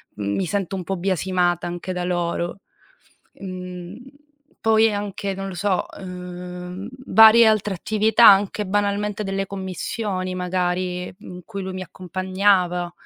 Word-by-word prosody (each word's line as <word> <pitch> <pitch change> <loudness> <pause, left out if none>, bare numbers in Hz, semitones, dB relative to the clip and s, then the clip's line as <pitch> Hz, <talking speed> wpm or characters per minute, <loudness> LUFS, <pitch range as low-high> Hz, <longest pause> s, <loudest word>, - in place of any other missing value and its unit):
mi 100 - -2
sento 195 +1 -2
un 185 - -4
po' 195 +2 -3
biasimata 180 -1 0
anche 175 +1 -5
da 180 0 -3
loro. 175 +1 -2 0.7
Mhmm, 180 0 -8 0.6
poi 225 0 +4
anche 200 -1 -3
non 195 0 -5
lo 190 - -7
so, 190 0 0
uhm, 180 +1 -7 0.2
varie 225 +1 +8
altre 210 -2 +2
attività, 220 +4 +4
anche 200 +1 +5
banalmente 205 +1 -1
delle 195 0 -2
commissioni 190 0 -4
magari, 180 0 -2
in 180 0 -10
cui 200 -3 -6
lui 190 0 -5
mi 185 - -5
accompagnava. 185 0 0
185 Hz, 130 wpm, -22 LUFS, 180-200 Hz, 0.7 s, varie